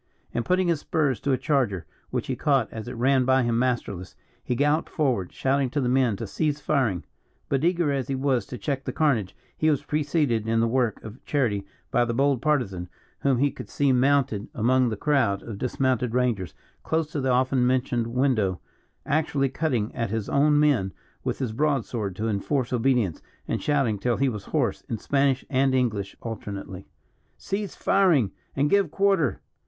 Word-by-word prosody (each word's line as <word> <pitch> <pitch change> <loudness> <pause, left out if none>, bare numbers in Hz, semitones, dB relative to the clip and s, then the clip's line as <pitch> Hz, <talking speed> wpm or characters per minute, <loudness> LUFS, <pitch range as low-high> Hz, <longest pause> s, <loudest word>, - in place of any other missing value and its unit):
And 120 - -1
putting 185 +7 +2
his 170 -3 +1
spurs 145 -6 0
to 140 - -1
a 130 - +3
charger, 125 - 0 0.2
which - - -2
he - - -2
caught 135 -6 +1
as 110 +1 -6
it 125 - -6
ran 130 +2 +3
by 130 0 +3
him 120 -1 +1
masterless, 120 -8 -2 0.3
he 125 - -1
galloped 145 +4 +1
forward, 125 - 0
shouting 135 0 0
to 145 - -1
the 130 - 0
men 125 -3 +2
to 115 - -5
cease 150 +7 -1
firing. 130 - 0 0.5
But 135 +1 0
eager 170 -3 +2
as 135 -2 -1
he 135 - -1
was 130 -5 0
to 125 - -6
check 135 -1 -3
the - - -3
carnage, 120 - +1 0.2
he 155 - +2
was 145 -2 +1
preceded 145 -6 0
in 115 0 +2
the 115 - +3
work 120 -1 0
of 110 +4 -10
charity 105 -9 0 0.2
by 120 -3 +3
the 115 -1 -2
bold 135 -1 +2
Partisan, 110 - 0 0.3
whom 135 -3 +2
he 140 +3 +2
could - - -9
see 140 -2 +2
mounted 130 -5 +2
among 125 +2 +3
the 110 - -3
crowd 115 -8 +1
of 110 -4 -7
dismounted 125 -2 0
rangers, 110 -11 0 0.3
close 160 -2 -1
to 145 - -2
the 130 - 0
often 130 0 +2
mentioned 125 -2 +1
window, 115 -7 +1 0.5
actually 140 -2 +1
cutting 130 -7 -1
at 115 -2 -2
his 110 -1 -2
own 145 +1 +3
men 130 -11 +2 0.3
with - - -2
his 125 -5 -3
broadsword 120 -7 -1
to 110 +4 -2
enforce 120 +5 -1
obedience, 120 - +1 0.3
and - - -2
shouting 135 -8 +1
till 120 +3 0
he 135 -1 +2
was 105 -5 -6
hoarse, - - 0
in 115 - -2
Spanish 135 +3 +1
and 135 -1 +2
English 105 -6 -1
alternately: 100 -4 -6 0.5
"Cease 200 0 -4
firing, 165 - +3 0.2
and 140 +2 +2
give 200 -4 +3
quarter." 190 - +1
130 Hz, 185 wpm, -25 LUFS, 115-145 Hz, 0.5 s, a